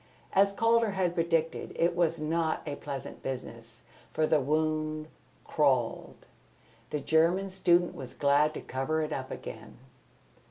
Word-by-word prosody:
As 200 +1 +5
Calder 230 +1 +2
had 185 -3 0
predicted, 165 -1 0
it 170 +1 +1
was 165 -2 +1
not 160 +1 -1
a 145 - -3
pleasant 140 -3 -7
business; 115 -3 -7 0.3
for 155 - +1
the 155 0 +3
wound 155 +2 -1 0.4
crawled. 130 -6 0 0.6
The 150 - -2
German 170 +6 +2
student 175 -2 +3
was 130 -2 -9
glad 145 +2 +3
to - - -5
cover 155 +5 -1
it 155 0 -3
up 130 -1 -4
again. 110 -1 -8
155 Hz, 135 wpm, -29 LUFS, 140-170 Hz, 0.6 s, As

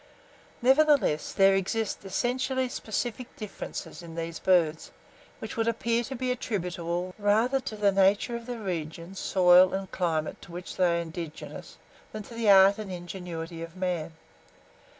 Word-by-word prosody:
Nevertheless, 270 - +4
there 195 0 +5
exist 195 +3 -1
essentially 255 +6 -1
specific 240 +1 -4
differences 210 -4 -7
in 165 -1 -10
these 165 -1 -4
birds, 165 -4 +2 0.5
which 220 - -7
would 225 0 0
appear 230 +1 +1
to 265 - -6
be 255 0 -1
attributable 180 -6 -3
rather 220 +6 +3
to 235 -4 -6
the 205 -1 +3
nature 195 +4 +3
of 235 0 -7
the 245 -1 -4
region, 170 -3 -5
soil, 185 -1 +5
and 190 -1 -5
climate 160 -4 -1
to - - -13
which 175 +1 -7
they 175 -2 +2
are - - 0
indigenous, 165 -1 -8 0.4
than 215 -1 -5
to 235 - -12
the 230 -2 0
art 195 +1 +7
and 205 -3 -6
ingenuity 175 -2 -6
of 165 +1 -8
man. 180 -3 -2
190 Hz, 150 wpm, -28 LUFS, 175-230 Hz, 0.5 s, art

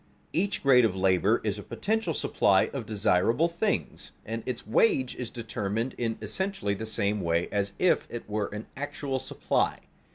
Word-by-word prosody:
_Each 195 +4 0
grade 130 -3 +6
of 105 -5 +2
labor 95 +3 +3
is 105 -1 -1
a - - -5
potential 210 - -1
supply 95 -2 +3
of 125 -6 -4
desirable 110 - +2
things 175 +5 -2
and - - -4
its - - -3
wage 420 - +2
is 125 -2 -5
determined 115 0 -3
in 115 -2 -2
essentially 190 - -1
the 110 +3 -5
same 105 -1 0
way 85 0 +1
as 100 -1 -1
if 180 - +2
it 120 - -6
were 105 -1 -1
an 105 +2 -7
actual 140 -1 -3
supply. 130 - -1
115 Hz, 165 wpm, -28 LUFS, 100-145 Hz, -, grade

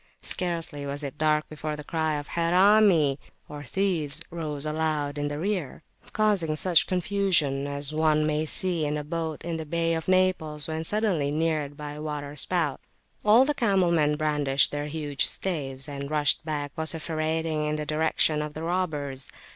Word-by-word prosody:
Scarcely 165 -5 -3
was 140 +1 -3
it 140 0 -6
dark 155 0 +2
before 155 0 -5
the 150 - -8
cry 160 0 -1
of 145 - -7
"Harami" 175 -4 +4 0.5
(thieves) 165 -4 0
rose 155 -3 -3
loud 150 -2 -1
in 145 - -1
the 145 0 -4
rear, 175 -4 -3 0.3
causing 200 -8 +1
such 170 +1 +3
confusion 180 -7 +1
as 140 +1 -3
one 155 -1 +2
may 155 +1 0
see 175 -1 +1
in 150 0 -1
a 150 - -4
boat 160 0 -4
in 170 -1 -2
the 160 - -4
Bay 165 +1 0
of 160 -1 -3
Naples 185 -5 +2
when 160 0 -3
suddenly 190 -6 0
neared 150 -2 -1
by 150 -1 -6
a 150 +1 -8
water 150 -1 -5
spout 155 -1 -1 0.4
[p.250] 210 - -1
All 235 +5 +7
the 295 - +1
camel 195 -9 +2
men 150 -3 +2
brandished 145 -3 +2
their 145 0 -3
huge 145 -2 0
staves, 140 -6 -1
and 140 -1 -6
rushed 150 -1 +2
back 145 -2 -3
vociferating 160 -1 -1
in 150 0 -1
the 150 0 -3
direction 155 0 +2
of 150 0 -5
the 155 - -5
robbers. 150 -7 -2
155 Hz, 170 wpm, -26 LUFS, 145-170 Hz, 0.5 s, All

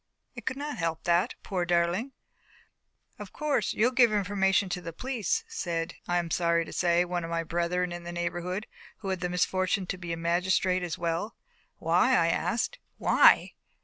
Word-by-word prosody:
It - - -10
could 260 - -1
not 290 -4 -5
help 165 -1 -2
that, 175 +7 +2
poor 185 -4 -2
darling! 175 +9 0 1.1
"Of - - -8
course, 290 -8 0
you'll 235 +4 +2
give 245 -3 +5
information 195 -1 +2
to 180 0 -3
the 170 - -6
police," 265 - -1
said, 170 - -3
I 175 - +1
am 170 -1 -2
sorry 170 -1 +2
to - - -9
say, 175 0 +2
one 175 -1 -2
of 165 - -5
my 165 0 -1
brethren 175 +2 -1
in 175 0 -5
the 175 - -6
neighbourhood, 175 +3 -3 0.4
who 195 - -4
had 190 -1 -1
the 180 0 -2
misfortune 185 +2 0
to 180 0 -4
be 175 -2 -5
a 165 - -2
magistrate 180 +2 +1
as 175 -2 -3
well. 170 +6 -2 0.4
"Why?" - - +3
I - - +3
asked. - - -1 0.2
"Why! - - +5
180 Hz, 180 wpm, -28 LUFS, 170-205 Hz, 1.1 s, give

